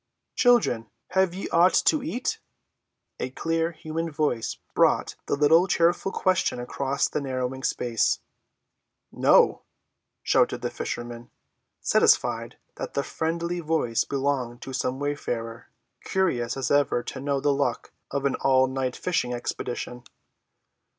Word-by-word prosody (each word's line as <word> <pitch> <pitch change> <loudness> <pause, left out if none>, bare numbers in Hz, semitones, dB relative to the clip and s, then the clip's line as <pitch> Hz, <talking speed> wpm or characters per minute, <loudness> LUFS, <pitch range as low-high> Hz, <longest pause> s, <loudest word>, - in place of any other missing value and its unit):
"Children, 240 - +3 0.2
have 190 -1 +2
ye 195 - -4
aught 175 +2 +4
to 310 - +3
eat?" 310 - -2 0.8
A 130 - -2
clear, 165 +5 -1
human 160 +1 -4
voice 145 -7 -1 0.2
brought - - +3
the - - +1
little 160 +5 +5
cheerful 175 +2 +2
question 185 -10 +1
across 135 +3 -1
the 150 - -3
narrowing 130 -1 -3
space. 120 -3 +1 0.9
"No," - - +4 0.6
shouted - - +2
the - - -1
fishermen, 120 0 -5 0.5
satisfied - - +2 0.2
that - - -6
the 140 - +1
friendly 170 +3 -2
voice 155 -8 0
belonged 135 -3 -2
to 135 - -7
some 130 0 -1
wayfarer, 120 -5 -4 0.4
curious 135 -12 0
as 130 -2 -2
ever 145 -4 +2
to 130 - -6
know 140 0 0
the 145 +1 +2
luck 140 +1 -1 0.2
of 140 0 -2
an 140 - +2
all‐night 130 -1 +2
fishing 125 -9 -1
expedition. 120 0 -5
140 Hz, 125 wpm, -26 LUFS, 125-165 Hz, 0.9 s, little